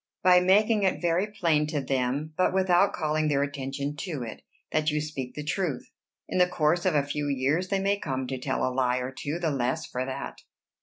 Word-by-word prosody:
"By 180 0 +7
making 210 +4 +4
it 190 -2 +1
very 175 +3 +1
plain 170 -8 +1
to 150 -1 -1
them, 135 +3 -1
but 185 +2 +2
without 190 0 +4
calling 155 -1 0
their 140 -2 +2
attention 140 0 -4
to 150 -6 -4
it, 115 - -8 0.3
that 155 0 +2
you 150 0 0
speak 145 -4 -5
the 150 - -5
truth. 155 -3 -2 0.4
In - - -1
the 180 0 +5
course 170 +3 +1
of 175 - +2
a 145 - +3
few 145 +1 -3
years 140 +6 0
they 195 - 0
may 200 +1 +1
come 130 -5 -3
to 130 0 -4
tell 130 +1 -1
a 130 - -1
lie 125 -1 +1
or 125 +1 -3
two 145 +4 -4
the 170 -3 -1
less 135 +4 -1
for 125 - -3
that." 130 0 -6
150 Hz, 215 wpm, -27 LUFS, 135-180 Hz, 0.4 s, By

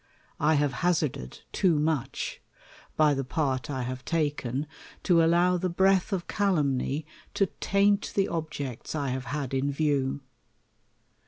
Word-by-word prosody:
1 155 +1 +3
have 145 -2 +1
hazarded 160 - -1
too 175 -5 +2
much, 150 -3 -2 0.6
by 150 -1 +5
the 135 -1 -1
part 135 -1 -1
I 130 -3 -2
have 130 +1 -5
taken, 145 -4 -1 0.4
to 170 -3 +4
allow 175 +2 +4
the 185 +1 -1
breath 190 +2 +3
of 185 -3 -1
calumny 150 -7 0 0.3
to 195 - +3
taint 200 +1 +2
the 195 - +3
obji 155 -7 -4
'cts - - -8
I 140 -3 -1
have 130 +1 -3
had 135 0 -3
in 135 +2 +1
view. 140 -2 0
150 Hz, 145 wpm, -28 LUFS, 135-175 Hz, 0.6 s, by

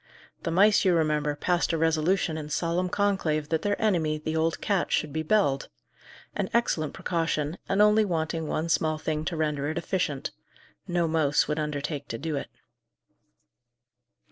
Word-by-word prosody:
The 170 - -3
mice, 200 +5 +5
you 185 -3 +4
remember, 150 -2 +1
passed 175 +3 0
a - - +1
resolution 160 +2 +1
in 150 -1 -5
solemn 170 +3 0
conclave 190 -7 0
that 160 -1 0
their 205 0 -1
enemy, 165 -8 +1
the 155 +1 -4
old 160 0 0
cat, 200 -4 0
should 150 -2 0
be 160 - -1
belled: 155 -6 +1 0.7
an 195 -2 -1
excellent 155 -10 +1
precaution, 165 -2 -1
and 200 +2 +4
only 210 +1 +5
wanting 160 -4 -2
one 160 +2 -1
small 155 -1 +1
thing 155 0 -2
to 170 - -3
render 150 -2 -1
it 160 - -3
efficient 150 -8 -2 0.6
no 175 -1 +1
mouse 155 -3 +2
would 150 +1 -1
undertake 150 -1 -3
to 115 - -4
do 155 +4 -3
it. 140 - -3
160 Hz, 165 wpm, -27 LUFS, 150-180 Hz, 0.7 s, mice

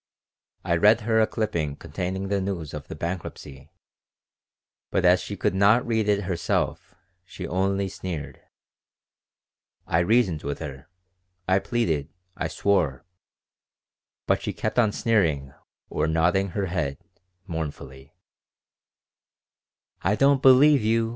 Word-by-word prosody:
I 85 - +1
read 105 +6 +5
her 110 +1 +2
a 110 - +3
clipping 85 -10 -2
containing 95 +5 -4
the 100 -1 0
news 90 -6 -4
of 75 0 -7
the - - -7
bankruptcy, 75 -5 -6 1.2
but - - 0
as - - +5
she - - -6
could - - 0
not 100 +5 +4
read 110 -3 0
it 100 0 +2
herself, 90 -2 -2 0.3
she 90 - -8
only 95 +1 0
sneered. 80 -7 -6 1.4
I 85 - +1
reasoned 90 -4 +2
with 70 0 -4
her, 70 -3 -8 0.6
I 95 +1 +4
pleaded, 85 - -1 0.3
I - - -2
swore; 80 -9 0 1.2
but - - +1
she - - -3
kept 110 +3 -1 0.2
sneering 80 -12 +1 0.3
or - - -1
nodding 85 +5 +2
her 100 - 0
head 80 -7 -2 0.5
mournfully 75 -5 -7 1.9
"I 95 +4 +1
don't 140 +2 +3
believe 140 +2 +6
you. 115 +1 +1
95 Hz, 120 wpm, -25 LUFS, 80-105 Hz, 1.9 s, believe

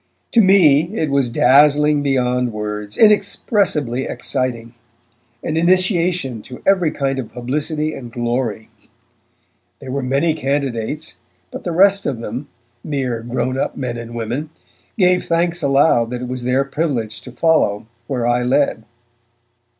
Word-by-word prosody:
To 230 - +5
me 180 -3 +4
it 155 -3 -1
was 140 -3 +2
dazzling 145 +4 +4
beyond 125 -3 0
words, 105 -1 -5
inexpressibly 195 - +2
exciting, 120 -3 -3 0.7
an 160 - -2
initiation 175 - +1
to 125 +3 -11
every 185 -4 +3
kind 135 -2 -2
of 120 - -6
publicity 150 +5 -2
and 120 -3 -9
glory. 120 -2 -2 1.1
There 130 - -8
were 140 +1 -2
many 140 +6 +1
candidates, 140 -1 -3 0.3
but - - -8
the 175 - -1
rest 195 +3 +3
of 130 -5 -2
them, 120 +5 -6 0.4
mere 130 -6 -2
grownup 130 +3 -2
men 125 -3 -3
and 115 0 -8
women, 120 +7 -3 0.5
gave 180 -2 +3
thanks 170 +1 0
aloud 135 -4 +3
that 125 0 -5
it - - -4
was 125 -1 -5
their 130 +2 +2
privilege 135 -7 -3
to 125 - -11
follow 120 -7 +1 0.2
where 125 -4 -2
I 120 +1 +2
led. 125 -2 +1
135 Hz, 135 wpm, -19 LUFS, 120-160 Hz, 1.1 s, To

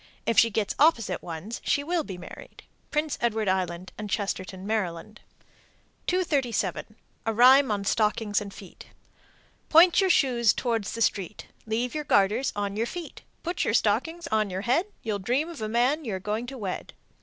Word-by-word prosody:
If 230 -3 +4
she 230 - +5
gets 210 -1 -1
opposite 230 - +3
ones, 175 +7 -6
she 285 - +1
will 335 +1 0
be 190 -9 -7
married. 175 - -11 0.3
Prince 300 -1 -1
Edward 220 -3 0
Island 185 -1 -1
and 210 -1 -5
Chestertown, 190 -1 -3
Md. 210 -1 -3 0.9
237. 255 - -1 0.3
A - - +3
rhyme 260 +3 +7
on 205 -2 -1
stockings 210 0 +1
and 200 -1 -7
shoes: 195 -2 -13 0.9
Point 340 +4 +7
your 380 - +2
shoes 240 - +3
towards 230 -5 -2
the 230 - 0
street, 195 -4 -2 0.2
Leave 235 +3 -1
your 305 -1 -3
garters 220 +1 +2
on 205 -1 -2
your 225 +2 -1
feet, 345 +1 -7 0.2
Put 345 +1 -1
your 225 - +1
stockings 295 +12 +1
on 215 -2 +1
your 185 +1 -3
head, 260 - +1 0.2
You'll 215 -3 -2
dream 250 - 0
of 335 - -9
the 215 -1 -3
man 250 +7 +1
you 220 -7 -3
are - - -4
going 215 +5 -3
to 270 +1 -7
wed. 195 -5 -5
225 Hz, 175 wpm, -26 LUFS, 200-270 Hz, 0.9 s, rhyme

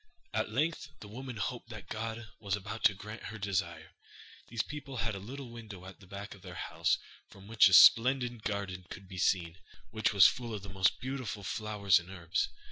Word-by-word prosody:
At - - 0
length 160 +5 -1
the 105 - -10
woman 125 +2 -7
hoped 115 +2 -4
that 110 -6 -9
God 110 +2 -5
was 100 -2 -1
about 105 +3 -7
to 100 - +6
grant 105 +3 -9
her 110 - -6
desire. 90 -5 -2 0.6
These 115 -2 -1
people 145 -3 -7
had 110 0 -1
a 100 - -5
little 125 +5 -8
window 110 -6 -9
at 95 - -11
the 95 - -16
back 100 +2 -7
of 100 - -15
their 90 -2 -9
house - - 0 0.3
from 95 - -15
which 115 0 +6
a 95 - +1
splendid 120 +1 +6
garden 100 -3 -3
could 95 - -9
be 90 -1 -7
seen, 85 -1 +1 0.3
which 110 0 +1
was 100 -2 +7
full 120 -3 +2
of 100 - -7
the 100 - -8
most 95 0 +2
beautiful 130 -5 -4
flowers 105 -1 +2
and 90 +1 -12
herbs. 85 -2 -1
105 Hz, 205 wpm, -32 LUFS, 95-115 Hz, 0.6 s, was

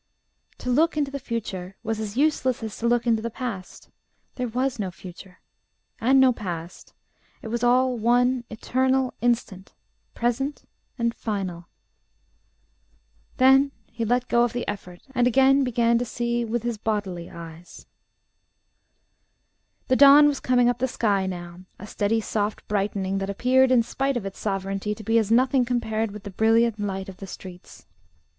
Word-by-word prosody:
To 250 - -3
look 310 +5 +2
into 285 -2 0
the 280 - -4
future 195 -7 -5
was 220 -1 -2
as 215 +1 -5
useless 265 -5 +1
as 220 -2 -5
to 235 - 0
look 240 0 +2
into 225 -2 +2
the 235 - -3
past. 220 -6 -7 0.4
There 250 -1 -3
was 255 +2 -2
no 195 -3 -2
future, 185 +1 -12 0.6
and 265 +3 +4
no 260 -1 +5
past: 175 -5 -7 0.5
it 220 - -6
was 235 +1 -2
all 250 +1 +3
one 245 +2 +2
eternal 260 +3 0
instant, 225 -5 -1 0.4
present 255 +5 -2 0.3
and 235 -1 0
final.... 190 -7 -4 1.7
Then 270 +1 +5 0.2
he 230 0 -4
let 245 +2 0
go 235 0 +3
of 240 0 -1
effort, 180 -4 -6
and 245 -1 +3
again 270 +2 +4
began 235 -2 +2
to - - -1
see 235 0 -2
with 230 0 -2
his 235 -3 -3
bodily 195 -6 -3
eyes. 165 +1 -11 2.0
The 255 - +3
dawn 285 +2 +8
was 285 -2 0
coming 245 -1 +3
up 245 -1 0
the 260 - +1
sky 200 -6 0
now, 175 -1 -7 0.2
a 205 - -9
steady 215 +2 0
soft 210 -1 -3
brightening 195 -1 -1
that 195 0 -3
appeared 255 +6 +3
in 245 -2 +5
spite 270 +3 -1
of 215 - -5
its 195 - -7
sovereignty 195 +1 -2
to 215 - -11
be 225 +2 +3
as 220 -2 -1
nothing 255 +3 +3
compared 225 -3 -1
with 205 0 -10
the 200 - -7
brilliant 225 +2 +2
light 195 -2 -3
of 190 -1 -10
the 195 - -9
streets. 185 -1 -11
230 Hz, 160 wpm, -24 LUFS, 200-250 Hz, 2.0 s, dawn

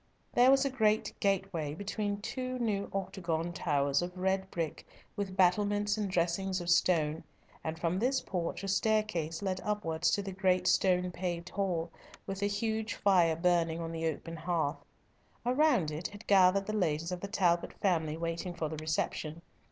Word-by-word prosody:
There 245 +1 +6
was 270 +1 +5
a 275 - 0
great 220 -4 +2
gateway 190 -7 0
between 205 +2 -3
two 255 +3 -3
new 210 -5 -1
octagon 175 -3 -2
towers 140 -4 +1
of 180 +1 -5
red 190 +1 0
brick, 165 -5 -3 0.3
with 195 -2 -4
battlements 205 +3 +3
and 210 -2 -2
dressings 185 +2 0
of 175 0 -1
stone, 160 -3 +2 0.4
and 160 0 -3
from 170 +2 0
this 260 +4 +2
porch 180 -2 -3
a - - -3
staircase 195 -5 0
led 185 -1 -1
upwards 180 -6 0
to 200 - -3
the 195 - -5
great 185 -1 +1
stone 180 -1 +3
paved 175 -1 -4
hall, 175 -4 -1 0.3
with 195 0 -5
a 200 - +2
huge 220 +2 -1
fire 175 -5 +4
burning 170 -1 +1
on 165 -1 -4
the 165 0 -2
open 165 +2 -4
hearth. 165 -2 -1 0.6
Around 250 - +3
it 155 +3 -3
had 205 +1 -12
gathered 195 0 +5
the 215 - -3
ladies 165 -4 0
of 180 - -3
the 200 - -4
Talbot 175 -5 +1
family 160 -5 +1
waiting 170 +1 -3
for 160 -2 -2
the 155 - -5
reception. 155 +1 -2
185 Hz, 170 wpm, -31 LUFS, 165-205 Hz, 0.6 s, There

